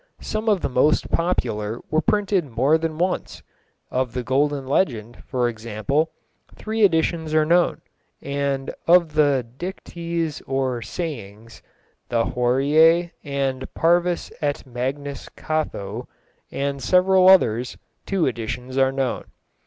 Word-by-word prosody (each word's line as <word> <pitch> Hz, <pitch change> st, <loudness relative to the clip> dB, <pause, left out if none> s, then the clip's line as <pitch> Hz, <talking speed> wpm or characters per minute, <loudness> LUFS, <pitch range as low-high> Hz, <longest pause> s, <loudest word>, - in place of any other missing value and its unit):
Some 215 Hz, +1 st, -2 dB
of 200 Hz, -4 st, +2 dB
the -, -, 0 dB
most 130 Hz, +4 st, +2 dB
popular 115 Hz, -10 st, -1 dB
were 155 Hz, +1 st, +3 dB
printed 205 Hz, -4 st, +1 dB
more 130 Hz, +7 st, +2 dB
than 160 Hz, -1 st, -3 dB
once; 180 Hz, +2 st, -2 dB, 0.5 s
of 130 Hz, -2 st, -1 dB
the 125 Hz, -, -3 dB
Golden 140 Hz, +2 st, 0 dB
Legend, 120 Hz, -, -1 dB
for 125 Hz, -3 st, 0 dB
example, 115 Hz, +7 st, -1 dB, 0.5 s
three 220 Hz, 0 st, -2 dB
editions 160 Hz, -3 st, +2 dB
are 155 Hz, -1 st, +4 dB
known, 175 Hz, +2 st, +2 dB, 0.4 s
and 140 Hz, -1 st, -2 dB
of 170 Hz, -2 st, +5 dB
the 145 Hz, -5 st, +3 dB
Dictes 170 Hz, -3 st, -4 dB
or 130 Hz, -2 st, -1 dB
Sayings, 115 Hz, -, -7 dB, 0.5 s
the 115 Hz, -1 st, +2 dB
Horæ, 150 Hz, +8 st, +3 dB
and 135 Hz, -2 st, -2 dB
Parvus 175 Hz, +1 st, +1 dB
et 145 Hz, -2 st, -2 dB
Magnus 135 Hz, +3 st, -4 dB
Catho, 125 Hz, -8 st, -3 dB, 0.4 s
and 140 Hz, 0 st, -2 dB
several 185 Hz, +2 st, +5 dB
others, 125 Hz, -, +4 dB, 0.3 s
two 195 Hz, -4 st, +1 dB
editions 125 Hz, +2 st, -3 dB
are 135 Hz, 0 st, +4 dB
known. 135 Hz, -2 st, -2 dB
140 Hz, 120 wpm, -23 LUFS, 125-170 Hz, 0.5 s, of